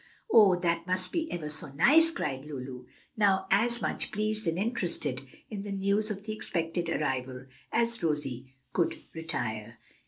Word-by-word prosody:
"Oh, 205 -5 +8
that 170 -1 0
must 185 0 +1
be 325 -1 -1
ever 165 -3 -3
so 150 -2 -5
nice!" 320 - +6
cried 135 - -3
Lulu, 130 -3 -7 0.3
now 195 -3 +3
as 235 +4 +3
much - - -1
pleased 215 -1 -1
and 165 +1 +1
interested 175 - -1 0.3
in 205 -2 -4
the 205 0 -5
news 200 +2 +1
of 200 -1 -4
the 215 0 -4
expected 170 -4 -2
arrival 130 -4 -2 0.3
as 235 0 +1
Rosie 135 -5 -2 0.2
could 170 - 0
desire. 120 -9 -4
175 Hz, 155 wpm, -30 LUFS, 145-210 Hz, 0.3 s, Oh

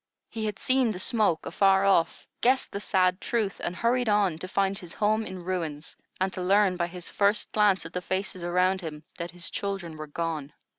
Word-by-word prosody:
He 220 -1 -3
had 210 -2 -3
seen 255 -2 +2
the 210 - -3
smoke 205 -5 +1
afar 195 0 +3
off, 190 -4 +2 0.2
guessed 260 +2 +3
the 200 - -3
sad 185 -2 +2
truth, 215 -5 -1
and 175 - -2
hurried 240 +3 +1
on, 200 -6 +2
to 185 - -5
find 195 +1 +1
his 175 -2 -10
home 215 +1 +1
in 185 -2 -7
ruins, 165 -5 -4 0.2
and 190 0 0
to 185 - -4
learn 195 +1 +3
by 170 -1 -1
his 175 0 -8
first 205 +1 +1
glance 205 -5 +3
at 165 - -9
the 180 - -2
faces 190 0 -3
around 180 +2 +2
him 155 -2 -7 0.2
that 170 0 -3
his 175 0 -5
children 190 -5 -4
were 155 0 -6
gone. 155 -2 -3
185 Hz, 205 wpm, -27 LUFS, 175-205 Hz, 0.2 s, afar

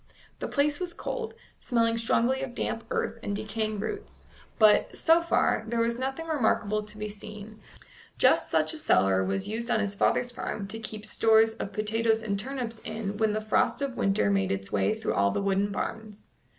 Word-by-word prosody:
The - - -3
place 290 0 +1
was 355 -2 -3
cold, 460 -2 -4 0.2
smelling 230 -2 +1
strongly 235 +3 +1
of 255 -3 -5
damp 225 - -3
earth 230 - -2
and 205 - -3
decaying 215 0 -3
roots; 220 - -6 0.3
but, 215 -2 +4
so 330 +1 +5
far, 335 -9 +1
there 235 +1 -1
was 235 +1 0
nothing 270 +5 -3
remarkable 220 -8 +1
to 210 0 -10
be 210 0 -4
seen; 215 +1 -9 0.6
just - - +4
such - - +2
a 315 - -6
cellar 95 - +3
was 95 +1 -1
used 230 +3 -3
on 230 - +2
his 205 -2 -1
father's 245 +4 +1
farm 210 -4 -4
to 225 - -4
keep 215 -1 -6
stores 225 0 +4
of 215 -3 -5
potatoes 225 +1 0
and 200 -2 -1
turnips 245 -2 -4
in 215 -2 -5
when 220 -1 +2
the 215 - -1
frost 215 +4 +1
of 270 -3 -3
winter 195 - +2
made 95 -1 +1
its 95 0 -3
way 100 -1 +1
through - - -2
all 100 0 +3
the - - -1
wooden 200 0 +1
barns. 215 +1 -5
220 Hz, 190 wpm, -28 LUFS, 205-235 Hz, 0.6 s, so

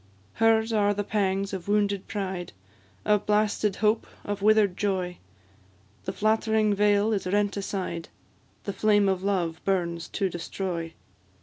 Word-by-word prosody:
Hers 225 0 +3
are 205 -1 +2
the 205 - -1
pangs 195 -1 -1
of 190 -1 -5
wounded 205 -1 +1
pride, 190 - -4 0.5
Of 210 -1 +2
blasted 210 -1 +2
hope, 215 +1 +1 0.2
of 205 -1 -3
wither'd 210 -3 +4
joy; 185 -3 -2 0.9
The - - -2
flattering 220 0 +2
veil 205 +1 +3
is 195 -3 -2
rent 205 +1 +1
aside, 190 -4 -4 0.5
The 200 - -3
flame 205 -1 +3
of 190 -1 +1
love 180 -5 -1
burns 170 -3 -1
to 195 - -1
destroy. 175 -1 -4
200 Hz, 135 wpm, -26 LUFS, 190-210 Hz, 0.9 s, wither'd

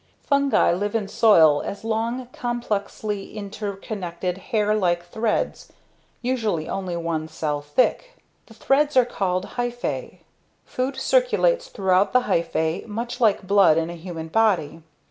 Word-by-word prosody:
Fungi 280 - +3
live 205 +5 -2
in 210 -3 0
soil 165 -9 +5
as 200 - -6
long, 230 +3 -2
complexly 215 -3 -3
interconnected 195 -3 -5
hair 210 -1 +2
like 175 -4 +1
threads 220 +4 -2 0.5
usually 225 -10 -1
only 185 -3 -3
one 165 -2 -2
cell 150 -2 -3
thick. 255 - 0 0.3
The - - -16
threads 290 +1 +2
are 255 - +6
called 185 -5 -1
"hyphae." 245 0 -3 0.4
Food 260 +2 -3
circulates - - +2
throughout 190 - +1
the 250 - +5
hyphae 170 -5 -1
much 235 +4 -5
like 210 -4 +3
blood 195 -5 +5
in 165 +1 -1
a - - -7
human 165 -1 -7
body. 185 -6 +1
205 Hz, 130 wpm, -23 LUFS, 175-240 Hz, 0.5 s, are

